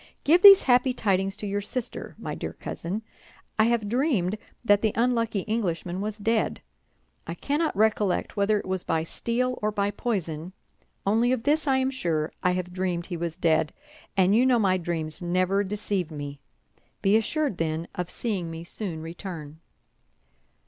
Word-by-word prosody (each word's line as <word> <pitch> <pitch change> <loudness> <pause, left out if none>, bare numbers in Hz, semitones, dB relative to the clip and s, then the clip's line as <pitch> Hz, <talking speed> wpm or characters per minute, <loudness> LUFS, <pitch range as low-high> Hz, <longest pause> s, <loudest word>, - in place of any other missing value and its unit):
Give 340 +5 +5
these 395 -1 +10
happy 250 0 +4
tidings 195 -3 0
to 210 - -4
your 200 0 -1
sister, 245 +4 -5
my - - -5
dear - - -5
cousin. 195 +6 -5 0.6
I 220 - +6
have 230 -2 +1
dreamed 215 - +1 0.3
that 205 -2 +5
the 220 -2 +1
unlucky 230 -3 +1
Englishman 185 -4 -2
was 210 0 -3
dead. 220 +1 0 0.6
I - - -4
cannot 300 -3 -1
recollect 210 -3 +1
whether 205 +1 +2
it - - -8
was 185 -1 -2
by 160 - 0
steel 250 +8 -2
or 215 0 +1
by 205 -1 0
poison; 185 -7 -3 0.5
only 225 +5 +3
of 255 -3 0
this 300 +2 +2
I 265 -1 +4
am 265 0 +1
sure, 165 - -1
I 180 - +2
have 180 0 -3
dreamed 180 -2 -1
he 180 - -5
was 165 -1 -4
dead, 160 -1 +2 0.4
and 190 +2 +4
you 240 - +5
know 255 -2 +4
my 190 -4 +3
dreams 165 -3 -4
never 185 +3 +1
deceive 200 -3 -2
me. 145 -2 -7 0.6
Be 195 +2 +4
assured, 260 - 0
then, 160 0 -1
of 180 -1 -4
seeing 195 -8 -3
me 165 0 -7
soon 170 -3 -5
return." 165 -3 -7
200 Hz, 170 wpm, -26 LUFS, 175-230 Hz, 0.6 s, these